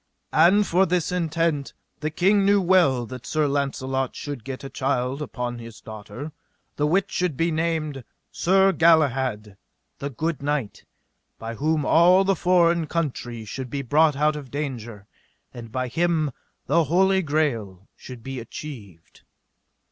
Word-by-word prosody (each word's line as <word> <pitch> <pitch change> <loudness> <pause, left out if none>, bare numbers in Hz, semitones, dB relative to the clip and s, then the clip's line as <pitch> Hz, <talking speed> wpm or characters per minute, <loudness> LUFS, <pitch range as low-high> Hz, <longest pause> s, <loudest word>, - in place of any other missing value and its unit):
And 190 +6 +5
for 185 +2 +2
this 175 -1 0
intent: 165 -4 -1 0.3
the 155 +1 -2
king 195 +6 +3
knew 200 +1 +4
well 170 -10 +3
that 125 +1 -9
Sir 155 -1 +1
Launcelot 135 -2 -2
should 145 -6 -6
get 135 0 -7
a - - -5
child 130 0 -1
upon 125 -4 -4
his 115 -2 -10
daughter, 110 +7 -8 0.4
the 150 - +1
which 190 +5 +1
should 180 -7 -1
be 165 +1 +1
named 155 -4 -2 0.3
Sir 190 +2 +3
Galahad 130 - +2 0.4
the 140 - -3
good 155 +4 -3
knight, 140 -6 -3 0.5
by 115 0 -6
whom 150 +4 0
all 180 +5 +5
the 195 0 +2
foreign 170 -2 +3
country 125 -8 -3
should 130 +4 -6
be 140 +2 -3
brought 150 +4 +3
out 150 +2 +2
of 145 -3 -8
danger, 120 -7 -5 0.5
and 115 -2 -9
by 130 +2 -2
him 160 +2 0 0.3
the 170 -1 +2
Holy 190 +5 +3
Greal 120 - -2
should 125 -3 -11
be 135 0 -5
achieved. 115 - -10
145 Hz, 150 wpm, -24 LUFS, 125-170 Hz, 0.5 s, And